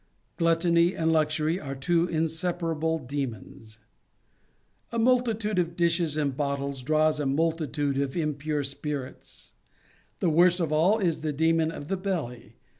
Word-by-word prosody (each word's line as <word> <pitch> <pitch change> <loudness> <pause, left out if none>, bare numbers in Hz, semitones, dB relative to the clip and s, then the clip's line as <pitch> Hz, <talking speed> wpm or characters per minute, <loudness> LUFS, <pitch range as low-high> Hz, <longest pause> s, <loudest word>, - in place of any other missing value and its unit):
Gluttony 170 +1 +3
and 160 0 +1
Luxury 155 +2 +1
are 140 -4 -6
two 165 +6 +1
inseparable 165 0 -1
demons. 120 -6 -6 1.1
A 235 - -3
multitude 225 -4 +2
of 170 -1 -1
dishes 170 -3 +1
and 140 -3 0
bottles 140 -1 -2
draws 155 +2 +2
a 145 - 0
multitude 145 -1 0
of 140 +2 -2
impure 150 -2 -1
spirits: 140 -1 -7 0.6
the 170 - +1
worst 175 +3 +4
of 165 -3 -1
all 175 +8 +4
is 175 -7 0
the 155 -1 -1
demon 160 +2 +2
of 145 -3 -7
the 195 - -1
belly. 170 -11 -4
160 Hz, 135 wpm, -27 LUFS, 145-170 Hz, 1.1 s, worst